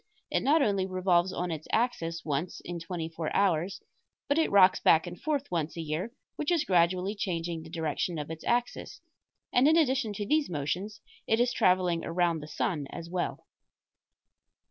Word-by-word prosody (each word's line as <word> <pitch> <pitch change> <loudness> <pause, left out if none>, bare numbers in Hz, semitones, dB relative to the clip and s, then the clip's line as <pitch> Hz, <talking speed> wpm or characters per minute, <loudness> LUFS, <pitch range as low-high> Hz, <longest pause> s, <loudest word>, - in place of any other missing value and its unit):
It - - +1
not 295 +2 +4
only 195 -4 +1
revolves 185 -1 +2
on 180 -1 -3
its 155 -1 -5
axis 170 -8 -1
once 150 +3 -2
in 175 0 -5
twenty 165 -1 -4
four 160 -1 -4
hours, 185 -2 +1 0.4
but 285 +3 +2
it 320 - +2
rocks 190 -2 +6
back 160 +2 +4
and 175 0 -8
forth 290 -2 -2
once 165 -1 -2
a - - -2
year, 160 +8 -3 0.3
which 300 - -1
is 335 -3 +2
gradually 180 - +2
changing 170 -5 -3
the 160 - -11
direction 165 +1 -2
of 150 +1 -5
its 160 - -7
axis; 240 0 -1 0.5
and 250 +3 +5
in 320 +2 +5
addition 260 -7 +2
to 205 +1 -4
these 305 +6 +1
motions 175 +7 -3 0.3
it 225 - +2
is 245 0 +2
traveling 180 -5 +2
around 170 -1 +1
the 150 - -9
sun 150 -2 -2
as 170 +4 -8
well. 180 -1 -3
180 Hz, 180 wpm, -29 LUFS, 165-215 Hz, 0.5 s, rocks